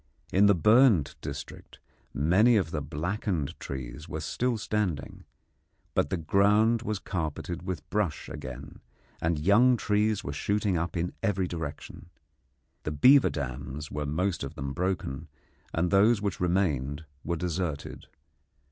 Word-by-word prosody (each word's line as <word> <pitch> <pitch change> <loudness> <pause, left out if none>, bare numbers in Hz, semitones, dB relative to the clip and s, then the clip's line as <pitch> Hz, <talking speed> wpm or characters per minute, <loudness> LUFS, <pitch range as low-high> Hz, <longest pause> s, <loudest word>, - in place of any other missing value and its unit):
In 100 +2 +6
the 100 - +5
burnt 105 - +5
district - - -8 0.3
many 95 - +4
of 90 -6 0
the 75 - -2
blackened 85 +2 -2
trees 65 +4 -7
were 80 - -4
still 120 +10 -1
standing, 105 -8 -3 0.7
but - - +1
the 95 - -1
ground 105 +7 +3
was 110 -3 -2
carpeted 85 -1 -4
with 90 -3 -5
brush 105 -7 -1
again, 65 +3 -8 0.4
and 80 0 +1
young 110 +10 +5
trees 105 -1 +1
were 70 - -4
shooting 100 +4 0
up 85 +1 -2
in 85 +1 -2
every 95 -4 0
direction. 80 -1 -7 0.7
The 75 - -3
beaver 130 - +6
dams 70 +1 -5
were 75 0 -3
most 90 +4 -1
of 70 +3 -6
them 70 -3 -4
broken, 85 -4 -2 0.4
and 85 +1 0
those 105 +3 +5
which 100 -2 -2
remained 80 -5 0 0.2
were 85 +1 -2
deserted. 85 -3 -4
90 Hz, 140 wpm, -28 LUFS, 75-105 Hz, 0.7 s, In